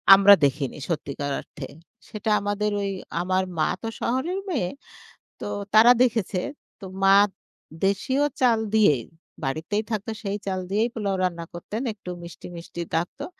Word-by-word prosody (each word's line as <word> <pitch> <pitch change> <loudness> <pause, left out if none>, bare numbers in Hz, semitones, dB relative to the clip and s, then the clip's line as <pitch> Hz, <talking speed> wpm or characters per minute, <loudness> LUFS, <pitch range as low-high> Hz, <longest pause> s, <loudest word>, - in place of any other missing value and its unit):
আমরা 200 +1 +8
দেখিনি 140 0 -1
সত্যিকার 145 -3 -3
অর্থে। 135 - -9 0.4
সেটা 215 0 -4
আমাদের 205 +1 -1
ওই 200 0 -1 0.3
আমার 185 +1 +1 0.2
মা - - +3
তো 225 - -4
শহরের 315 +11 -1
মেয়ে। 235 - 0 0.7
তো - - -4 0.3
তারা 230 +3 +9
দেখেছে। 220 -6 0 0.4
তো - - -7 0.2
মা 195 0 +7 0.7
দেশীয় 260 +9 +1 0.2
চাল 235 -3 +4 0.2
দিয়েই 150 - +4 0.4
বাড়িতেই 160 +10 -1
থাকতো 215 +1 -2
সেই 200 +1 -2
চাল 190 -1 -1
দিয়েই 220 +4 +2
পোলাও 200 -3 -1
রান্না 170 -2 -1
করতেন। 210 +7 -5
একটু 190 -3 -11
মিষ্টি, 170 - -10
মিষ্টি 170 0 -7
থাকতো। 170 +2 -2
200 Hz, 145 wpm, -25 LUFS, 170-220 Hz, 0.7 s, তারা